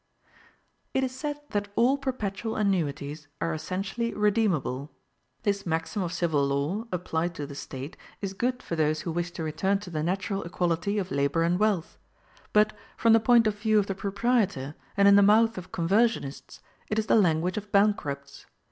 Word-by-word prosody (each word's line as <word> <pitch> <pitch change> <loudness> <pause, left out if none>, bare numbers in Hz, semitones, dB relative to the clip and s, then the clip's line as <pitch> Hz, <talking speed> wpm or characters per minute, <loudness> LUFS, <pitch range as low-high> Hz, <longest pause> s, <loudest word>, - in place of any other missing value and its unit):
It 265 - +2
is 260 - -1
said 295 +2 -4
that 205 0 -1
all 250 +4 +4
perpetual 230 -6 -3
annuities 155 -7 -1
are 165 - -1
essentially 195 +8 -3
redeemable. 195 - +1 0.5
This 200 -2 0
maxim 165 +4 -2
of 175 -2 -2
civil 170 -5 +1
law, 140 +10 -1
applied 170 -1 -2
to 145 - -4
the 140 - -9
State, 140 +5 -7 0.2
is 195 -2 -4
good 250 +5 -1
for 170 - -3
those 155 -1 +1
who 170 - -3
wish 175 +1 -2
to 165 - -5
return 165 +6 0
to 185 -3 -9
the 155 -2 -2
natural 190 +4 -1
equality 175 +3 -1
of 190 -3 -2
labor 140 +4 +1
and 175 +2 +1
wealth; 205 -6 0 0.5
but, 210 0 +4 0.2
from 230 -1 +4
the 225 - +7
point 235 +1 +5
of 210 -1 0
view 215 0 +2
of 205 - +3
the 195 - -2
proprietor, 200 - 0 0.2
and 200 0 +6
in 200 - +8
the - - +7
mouth 225 +3 +5
of 185 0 -8
conversionists, 190 - 0 0.3
it 215 - -1
is 220 - +1
the - - +3
language 180 -3 +2
of 210 -1 -5
bankrupts. 145 -9 0
195 Hz, 180 wpm, -27 LUFS, 160-215 Hz, 0.5 s, in